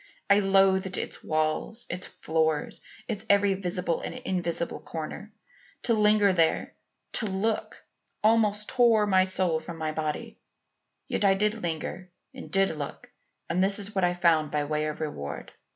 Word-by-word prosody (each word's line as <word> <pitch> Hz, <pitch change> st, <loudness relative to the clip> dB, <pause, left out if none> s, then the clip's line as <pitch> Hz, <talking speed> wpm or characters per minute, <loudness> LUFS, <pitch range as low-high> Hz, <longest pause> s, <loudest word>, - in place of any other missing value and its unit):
I 200 Hz, -, +7 dB
loathed 195 Hz, -1 st, +3 dB
its -, -, -4 dB
walls, 155 Hz, +9 st, -1 dB
its 180 Hz, +1 st, -5 dB
floor, 160 Hz, -1 st, -1 dB, 0.4 s
its 215 Hz, -4 st, -3 dB
every 200 Hz, 0 st, +4 dB
visible 180 Hz, -2 st, -2 dB
and -, -, -5 dB
invisible 180 Hz, -9 st, -2 dB
corner. 165 Hz, +6 st, -7 dB, 0.5 s
To 235 Hz, -, +2 dB
linger 210 Hz, -2 st, +4 dB
there 165 Hz, -3 st, +1 dB, 0.4 s
to 220 Hz, -, +1 dB
look 200 Hz, +3 st, -2 dB, 0.4 s
almost 215 Hz, -1 st, +3 dB
tore 235 Hz, -4 st, +4 dB
my 190 Hz, -2 st, +4 dB
soul 185 Hz, -3 st, +1 dB
from 165 Hz, +1 st, -8 dB
my 155 Hz, -1 st, -2 dB
body; 155 Hz, -1 st, -4 dB, 0.7 s
yet -, -, -2 dB
I 195 Hz, -1 st, +5 dB
did 210 Hz, +2 st, +2 dB
linger 175 Hz, +2 st, -4 dB, 0.2 s
and 260 Hz, -, -9 dB
did 195 Hz, -3 st, +1 dB
look 145 Hz, -2 st, -7 dB, 0.4 s
and 180 Hz, +2 st, +1 dB
this 195 Hz, +1 st, +3 dB
is 205 Hz, +1 st, -2 dB
what 190 Hz, -2 st, 0 dB
I 175 Hz, 0 st, +2 dB
found 165 Hz, -3 st, +3 dB
by 150 Hz, 0 st, 0 dB
way 150 Hz, +1 st, -1 dB
of 155 Hz, +1 st, -5 dB
reward. 75 Hz, -, -5 dB
185 Hz, 155 wpm, -27 LUFS, 160-205 Hz, 0.7 s, I